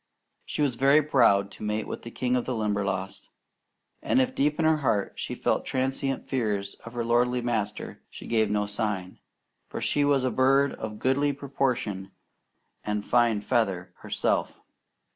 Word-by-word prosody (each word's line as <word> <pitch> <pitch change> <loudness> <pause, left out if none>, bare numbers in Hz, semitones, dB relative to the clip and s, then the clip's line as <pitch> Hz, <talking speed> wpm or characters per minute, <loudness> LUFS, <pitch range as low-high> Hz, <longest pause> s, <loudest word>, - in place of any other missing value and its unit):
She 150 - -1
was 130 -5 0
very 140 +4 +5
proud 100 -9 +3
to - - -10
mate 105 +1 -1
with - - -5
the 115 - -8
king 125 +1 -1
of 125 - 0
the 130 - -2
Limberlost; 100 -3 -2 0.7
and 265 - +2
if 260 0 +1
deep 150 - +1
in 165 - +1
her 160 0 +4
heart 115 -9 0
she - - -4
felt - - 0
transient 135 +1 -2
fears 105 -6 -1
of 115 - -10
her 120 -1 -2
lordly 125 +1 +2
master, 110 -4 -3
she - - -10
gave 110 -2 +2
no 105 0 +1
sign, 100 -3 -3 0.5
for - - -5
she 145 - +1
was 140 -2 +3
a 130 - +1
bird 135 +3 +3
of 105 -1 -6
goodly 140 +4 +1
proportion 125 -8 -2 0.7
and 105 -1 -2
fine 120 -3 +3
feather 105 -6 0
herself. - - -1
120 Hz, 165 wpm, -27 LUFS, 105-135 Hz, 0.7 s, very